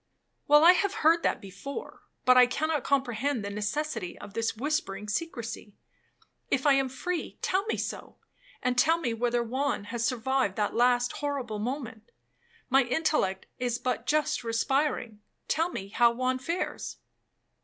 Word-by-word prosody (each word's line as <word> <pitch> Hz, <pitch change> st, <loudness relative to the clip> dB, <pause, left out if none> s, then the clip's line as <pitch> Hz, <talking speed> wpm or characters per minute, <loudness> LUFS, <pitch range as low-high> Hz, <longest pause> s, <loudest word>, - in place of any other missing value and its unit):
'—'Well, 295 Hz, +1 st, +7 dB
I 345 Hz, -, +10 dB
have 400 Hz, +3 st, +1 dB
heard 330 Hz, +2 st, +6 dB
that -, -, 0 dB
before, 200 Hz, -, -8 dB, 0.2 s
but 255 Hz, -, +7 dB
I 250 Hz, -1 st, +8 dB
cannot 305 Hz, +2 st, -1 dB
comprehend 265 Hz, -3 st, 0 dB
the 200 Hz, -, -4 dB
necessity 210 Hz, -, -3 dB
of 205 Hz, -1 st, -11 dB
this 225 Hz, 0 st, -1 dB
whispering 225 Hz, -7 st, -2 dB
secrecy. 225 Hz, -4 st, -4 dB, 0.7 s
If 265 Hz, 0 st, 0 dB
I 285 Hz, -, +6 dB
am 270 Hz, -1 st, +2 dB
free, 345 Hz, +6 st, -4 dB
tell 385 Hz, +3 st, +1 dB
me -, -, -1 dB
so, -, -, -5 dB, 0.5 s
and 250 Hz, -1 st, +1 dB
tell 325 Hz, +6 st, +4 dB
me 250 Hz, -9 st, -2 dB
whether 240 Hz, +1 st, 0 dB
Juan 260 Hz, 0 st, -1 dB
has 235 Hz, -1 st, -1 dB
survived 255 Hz, -3 st, 0 dB
that 210 Hz, -1 st, 0 dB
last 245 Hz, 0 st, +3 dB
horrible 270 Hz, -7 st, -3 dB
moment,—my 265 Hz, -, -3 dB
intellect 245 Hz, -8 st, 0 dB
is 245 Hz, -1 st, 0 dB
but 250 Hz, 0 st, -2 dB
just 300 Hz, -4 st, +1 dB
respiring. 230 Hz, -1 st, 0 dB, 0.3 s
Tell 330 Hz, +2 st, +1 dB
me 195 Hz, -, -6 dB
how 235 Hz, +3 st, +4 dB
Juan 255 Hz, +1 st, 0 dB
fares.' 335 Hz, +7 st, -3 dB
255 Hz, 150 wpm, -28 LUFS, 230-295 Hz, 0.7 s, I